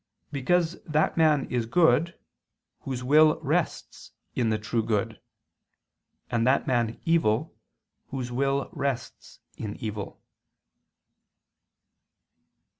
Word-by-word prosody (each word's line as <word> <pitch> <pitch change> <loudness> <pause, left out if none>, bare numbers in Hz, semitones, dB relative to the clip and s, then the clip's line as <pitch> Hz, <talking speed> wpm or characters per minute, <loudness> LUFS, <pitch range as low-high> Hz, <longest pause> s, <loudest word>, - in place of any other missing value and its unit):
Because 165 +5 0
that 155 0 0
man 155 -4 +3
is 120 -2 -1
good, 165 +4 +3 0.6
whose 130 -2 -5
will 155 +3 +5
rests - - -2 0.2
in 120 -3 0
the 110 - +1
true 110 +2 -1
good: 110 -2 -2 1.1
and 115 0 +1
that 135 +2 +3
man 120 -3 0
evil, 160 -10 +2 0.5
whose 130 -2 -5
will 135 +2 0
rests 135 -3 -4 0.2
in 105 -2 -5
evil. 105 -2 -6
130 Hz, 100 wpm, -27 LUFS, 115-155 Hz, 1.1 s, will